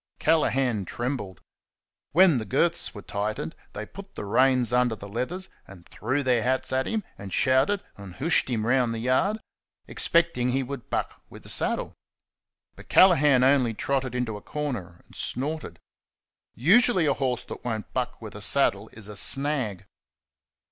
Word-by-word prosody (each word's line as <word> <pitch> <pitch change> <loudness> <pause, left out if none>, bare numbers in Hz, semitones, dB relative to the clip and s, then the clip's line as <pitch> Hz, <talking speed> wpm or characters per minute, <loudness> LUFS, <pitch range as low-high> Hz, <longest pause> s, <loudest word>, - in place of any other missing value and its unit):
Callaghan 130 -9 +1
trembled. 120 - -5 0.7
When 170 -5 +5
the 110 - -5
girths 165 - +1
were 100 - -9
tightened 100 -6 -4 0.2
they 105 - -5
put 195 - -12
the - - -6
reins 125 +2 +2
under 125 -2 +2
the 100 -1 -10
leathers, 130 - -4 0.2
and 90 -2 -14
threw 130 +6 -2
their 125 -3 +2
hats 130 +2 -1
at 130 0 0
him, 220 -2 -2 0.2
and 100 -1 -8
shouted, 135 - +2
and 100 -3 -10
"hooshed" 160 -1 +2
him 110 -3 -1
round 120 -1 +1
the - - -4
yard, 130 - +1 0.5
expecting 170 -8 +1
he 135 0 0
would 135 -1 -8
buck - - -3
with - - -13
the - - -10
saddle. - - +1 0.8
But - - -15
Callaghan 150 -8 +5
only 130 -4 +3
trotted 130 0 -2
into 120 -4 -2
a - - -12
corner 120 - -5
and - - -19
snorted. 150 +5 -3 0.8
Usually, 185 - +4
a 140 - +3
horse 130 -3 -2
that - - -9
won't 110 -3 -4
buck 125 -1 -3
with 110 -3 -9
a 105 - -9
saddle 110 -4 +2
is 105 -2 -8
a 105 - -9
"snag." 135 -6 +1
125 Hz, 160 wpm, -26 LUFS, 110-145 Hz, 0.8 s, When